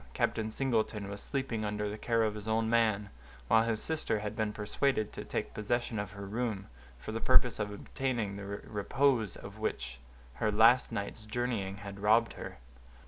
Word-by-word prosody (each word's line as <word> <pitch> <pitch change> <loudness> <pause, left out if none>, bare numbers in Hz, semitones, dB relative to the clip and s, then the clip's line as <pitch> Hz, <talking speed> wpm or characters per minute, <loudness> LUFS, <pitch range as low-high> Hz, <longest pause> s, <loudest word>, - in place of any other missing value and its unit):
Captain 110 -1 +1
Singleton 110 -4 0
was 100 0 -5
sleeping 130 -6 -2
under 105 0 -1
the 105 - -3
care 115 +1 +1
of 110 -1 +1
his 105 0 -7
own 110 0 +2
man, 110 -3 +2 0.4
while 110 - +6
his 115 -1 0
sister 160 -6 +1
had 105 0 -4
been 110 -1 0
persuaded 110 +2 0
to - - -5
take - - -3
possession 115 +1 -1
of 105 0 -4
her 100 0 -7
room, 105 -1 -2 0.3
for - - -7
the - - -3
purpose - - +4
of 105 -1 -1
obtaining 115 -1 -2
the 100 - -6
repose 110 +3 +1
of - - -10
which 65 -1 -3 0.4
her 110 - +3
last 115 +4 +6
night's 100 +2 -4
journeying 110 -3 -2
had 100 -1 -8
robbed 110 +3 +4
her. - - -7
110 Hz, 180 wpm, -32 LUFS, 100-115 Hz, 0.4 s, while